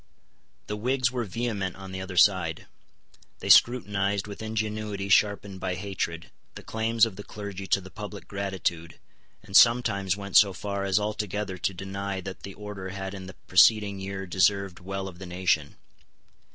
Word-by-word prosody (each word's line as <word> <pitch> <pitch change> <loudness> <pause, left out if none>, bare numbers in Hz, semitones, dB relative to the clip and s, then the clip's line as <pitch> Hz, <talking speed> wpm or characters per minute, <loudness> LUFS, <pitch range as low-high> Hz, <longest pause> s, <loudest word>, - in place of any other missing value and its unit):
The 105 - -4
Whigs 130 +3 +1
were 125 -2 -2
vehement 100 -3 -3
on 95 -1 -9
the 95 0 -5
other 95 -1 -7
side. 90 -4 +3 0.7
They - - -6
scrutinised, 100 -5 +4
with 100 0 -8
ingenuity 110 -2 -3
sharpened 100 -1 +2
by 95 -1 -2
hatred, 90 -4 -4 0.2
the - - -9
claims 110 0 +2
of 105 -5 -7
the 105 - -7
clergy 100 -2 -7
to 100 - +3
the 95 -1 -12
public 105 -2 -8
gratitude, 95 -4 -3 0.5
and 95 0 -8
sometimes 105 -6 +5
went 100 -1 +1
so 100 -2 +6
far 100 +1 -3
as 95 0 +2
altogether 105 -2 -3
to 95 - -1
deny 95 +1 -4
that 95 0 -8
the 100 - -9
order 105 -2 -7
had 95 0 -5
in 95 -2 -8
the 95 - -10
preceding 100 +2 +5
year 95 0 -5
deserved 95 +1 +1
well 95 +1 -5
of 90 -2 -10
the 95 - -8
nation. 90 -5 0
100 Hz, 165 wpm, -27 LUFS, 95-105 Hz, 0.7 s, so